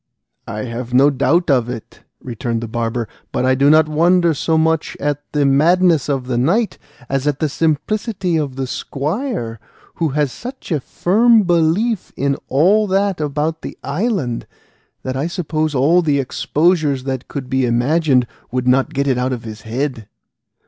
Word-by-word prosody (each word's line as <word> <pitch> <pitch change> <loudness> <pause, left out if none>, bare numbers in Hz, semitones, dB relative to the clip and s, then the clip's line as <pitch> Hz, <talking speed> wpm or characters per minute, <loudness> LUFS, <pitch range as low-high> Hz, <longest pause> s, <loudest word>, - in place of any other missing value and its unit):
"I 105 +1 -4
have 120 0 -5
no 140 +3 +6
doubt 145 +5 +2
of 125 -3 +2
it," 120 -3 -8 0.2
returned 115 -1 -3
the 115 - -4
barber; 115 0 -2 0.2
"but 125 - 0
I 130 - +4
do 140 +2 +3
not 155 0 +5
wonder 170 +2 +3
so 160 +2 0
much 160 0 0
at 145 0 -1
the 145 -1 +1
madness 160 +3 +3
of 135 -3 -1
the 125 -1 -1
knight 200 - +1 0.3
as 135 +1 -1
at 145 -2 +1
the 155 - 0
simplicity 175 - -1
of 145 -5 -1
the 135 0 -2
squire, 145 - -3 0.4
who 165 -2 0
has 145 -3 +1
such 250 - -9
a 155 - +1
firm 220 - +3
belief 175 +5 +1
in 140 0 +1
all 195 +10 +3
that 195 -2 0
about 150 +2 -2
the - - -8
island, 155 - -2 0.6
that 130 0 -3
I 140 +5 -1
suppose 155 -4 -2
all 155 +7 +4
the 150 -4 +1
exposures 150 +1 +1
that 130 -2 -4
could 135 -3 -6
be 130 -1 +1
imagined 130 +2 +2 0.2
would 125 0 -2
not 135 +5 +2
get 140 +1 +1
it 130 -2 +1
out 130 +1 0
of 120 - -5
his 110 -1 -8
head." 120 -1 -3
145 Hz, 170 wpm, -18 LUFS, 130-170 Hz, 0.6 s, no